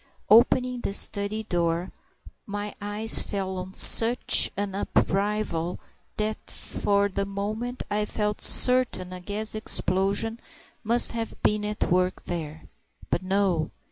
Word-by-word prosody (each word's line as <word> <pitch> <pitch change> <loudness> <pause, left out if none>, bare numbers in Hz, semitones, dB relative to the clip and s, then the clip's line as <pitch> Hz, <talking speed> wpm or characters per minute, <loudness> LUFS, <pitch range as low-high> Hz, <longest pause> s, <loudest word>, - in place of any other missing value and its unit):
Opening 250 +2 +3
the 195 - -4
study 205 +2 +1
door, 170 -2 -2 0.6
my 205 0 -6
eyes 210 +2 +2
fell 190 -2 -5
on 185 +1 -9
such 235 +4 +6
an 200 -1 -4
upheaval 195 -3 -2 0.4
that 215 0 -5
for 200 0 -2
the 200 0 -4
moment 215 +5 -5
I 210 0 -1
felt 210 0 -4
certain 250 -8 +5
a 180 - -9
gas 210 +3 -3
explosion 215 +1 -1 0.4
must 235 +2 +3
have 230 -1 -6
been 210 0 0
at 210 -3 -3
work 180 +1 -1
there. 160 -3 -7 0.5
But - - 0
no! 185 -4 -1
205 Hz, 125 wpm, -24 LUFS, 185-215 Hz, 0.6 s, such